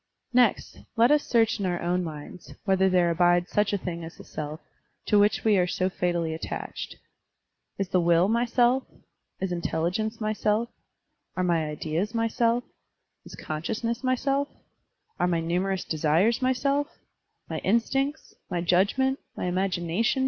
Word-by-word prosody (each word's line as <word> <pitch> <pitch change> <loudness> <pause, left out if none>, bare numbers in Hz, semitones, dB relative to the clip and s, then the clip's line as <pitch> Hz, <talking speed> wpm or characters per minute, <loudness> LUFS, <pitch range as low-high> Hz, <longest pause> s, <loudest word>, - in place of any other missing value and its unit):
Next, 245 -3 +2 0.2
let 235 +3 +5
us 295 0 +4
search 225 -2 +2
in 200 - -1
our 175 -1 -1
own 180 +1 0
minds 160 +1 -8
whether 190 -1 +3
there 180 -2 +3
abides 175 +1 +3
such 210 0 +2
a 205 - +1
thing 170 -3 -5
as 165 - -9
the - - -11
self, 150 0 -6 0.5
to 210 - +4
which 205 +1 +3
we 215 -2 +4
are 180 -1 +3
so 185 +1 -1
fatally 175 -3 -1
attached. 160 - -5 0.8
Is 195 -2 -2
the 185 -2 +2
will 170 +1 +4
my 235 +3 +2
self? 245 +2 +3 0.6
Is 190 -1 -2
intelligence 175 +6 -1
my 215 -1 -1
self? 215 +2 0 0.7
Are 185 - +1
my 170 -3 +1
ideas 160 +8 -3
my 230 0 +2
self? 235 +1 +1 0.6
Is - - -10
consciousness 225 - -3
my 255 0 +2
self? 275 +2 0 0.7
Are - - +2
my 170 -2 +1
ntmierous 180 +3 -1
desires 165 - +2
my 255 0 +3
self? 280 +3 0 0.6
My - - -3
instincts? 270 +8 0 0.2
my 180 -2 -1
judgment? 200 +10 +2 0.2
my - - -2
imagination? 180 +5 0
190 Hz, 160 wpm, -26 LUFS, 175-230 Hz, 0.8 s, let